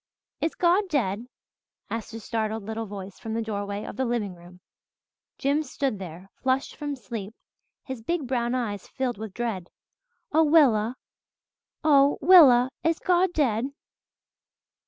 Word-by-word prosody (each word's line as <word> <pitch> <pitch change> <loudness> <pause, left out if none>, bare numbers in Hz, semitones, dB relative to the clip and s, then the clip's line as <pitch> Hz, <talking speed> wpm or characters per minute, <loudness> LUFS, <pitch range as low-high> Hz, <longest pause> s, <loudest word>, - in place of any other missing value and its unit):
"Is 320 - -1
God 365 +3 +3
dead?" 235 - -1 0.6
asked 225 -1 -4
a - - -5
startled 220 0 -2
little 220 +1 -4
voice 195 -1 -8
from 225 0 -5
the 230 - 0
doorway 205 -1 -4
of - - -8
the 265 - +1
living 235 -6 -1
room. 175 +1 -15 0.8
Jims 285 +1 0
stood 265 -8 -2
there, 185 +1 -9
flushed 260 0 0
from 290 -1 -4
sleep, 220 -3 -7 0.5
his 260 -4 -6
big 320 +5 -2
brown 245 -1 0
eyes 210 -6 -3
filled 255 -5 -3
with 220 -2 -6
dread, 225 -7 -3 0.6
"Oh 320 +2 +5
Willa 255 -7 +4 0.9
oh, 285 -2 +5
Willa, 270 -7 +7
is 330 0 +2
God 360 0 +2
dead?" 250 -8 +1
240 Hz, 140 wpm, -26 LUFS, 210-280 Hz, 0.9 s, Willa